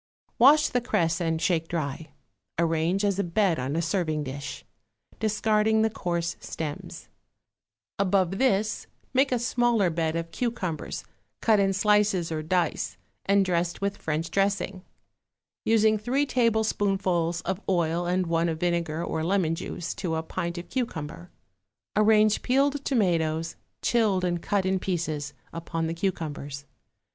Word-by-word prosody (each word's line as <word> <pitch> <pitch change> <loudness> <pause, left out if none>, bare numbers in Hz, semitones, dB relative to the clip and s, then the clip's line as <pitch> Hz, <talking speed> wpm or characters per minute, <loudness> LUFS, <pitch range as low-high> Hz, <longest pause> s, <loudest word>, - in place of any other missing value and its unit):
= - - -43
Wash 300 +5 +7
the 245 - 0
cress 170 -7 0
and 165 -1 0
shake 165 -3 +1
dry; 160 -1 -3 0.5
arrange 165 +4 +1
as 200 -1 +1
a - - +2
bed 175 -2 +1
on 130 +4 -2
a 165 - 0
serving 160 -3 0
dish, 140 0 -6 0.5
discarding 220 0 +2
the 220 - +2
coarse 170 -4 -2
stems; 150 -3 -6 0.9
above 195 -1 +2
this 215 -5 +1 0.3
make 270 +1 +3
a 250 - +3
smaller 240 -5 +2
bed 160 -1 -1
of 165 0 -3
cucumbers, 210 -10 -3 0.4
cut 220 -2 +4
in 195 -1 +3
slices 200 -3 +2
or 155 -1 -2
dice 175 +3 -1 0.3
and 200 0 +4
dressed 175 -1 0
with 200 0 -1
French 160 +1 -2
dressing, 195 -1 0 0.8
using 220 -1 +4
three 260 +7 +1
tablespoonfuls 200 -8 +1
of 190 +2 -3
oil 175 -1 +1
and 180 +1 +1
one 165 0 +1
of 160 -1 -3
vinegar 170 -2 0
or 160 - -2
lemon 175 -2 +1
juice 165 +1 -4
to 165 -3 -3
a 160 - -2
pint 170 +1 -4
of 175 - -6
cucumber. 175 - -4 0.7
Arrange 215 0 +4
peeled 275 +2 +1
tomatoes, 165 - +1 0.3
chilled 210 -6 +2
and 175 -1 -1
cut 200 0 0
in 190 0 +1
pieces, 155 -6 -3 0.2
upon 165 0 -3
the 165 - -2
cucumbers. 150 -6 -4
180 Hz, 145 wpm, -27 LUFS, 165-210 Hz, 0.9 s, Wash